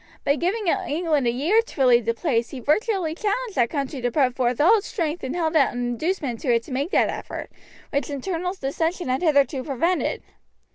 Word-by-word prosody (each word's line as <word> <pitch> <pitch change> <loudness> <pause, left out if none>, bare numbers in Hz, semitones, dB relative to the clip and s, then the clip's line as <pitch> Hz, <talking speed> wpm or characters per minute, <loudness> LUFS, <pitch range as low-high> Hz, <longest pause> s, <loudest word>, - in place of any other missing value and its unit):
By 280 - +3
giving 385 +7 -1
England 330 -6 0
a - - +3
year 320 - +3
to 455 -11 -7
relieve 245 -3 +5
the 230 0 0
place 235 -4 0
he 270 - -7
virtually 345 - 0
challenged 425 +5 -2
that 240 -6 +2
country 275 -3 -3
to 245 - +1
put 255 -1 +1
forth 245 -2 0
all 400 +9 +6
its 405 - -9
strength 335 -5 -3
and 260 +4 -3
held 325 -2 -1
out 280 -4 +4
an 245 0 -2
inducement 265 -1 -2
to 260 - 0
it 230 -1 +2
to - - -12
make 275 +5 -1
that - - +3
effort, - - -6 0.4
which 280 -3 -1
internal 345 +5 -3
dissension 325 +4 -2
had 255 +1 0
hitherto 285 -4 +2
prevented. 320 +7 -1
295 Hz, 205 wpm, -24 LUFS, 255-355 Hz, 0.4 s, all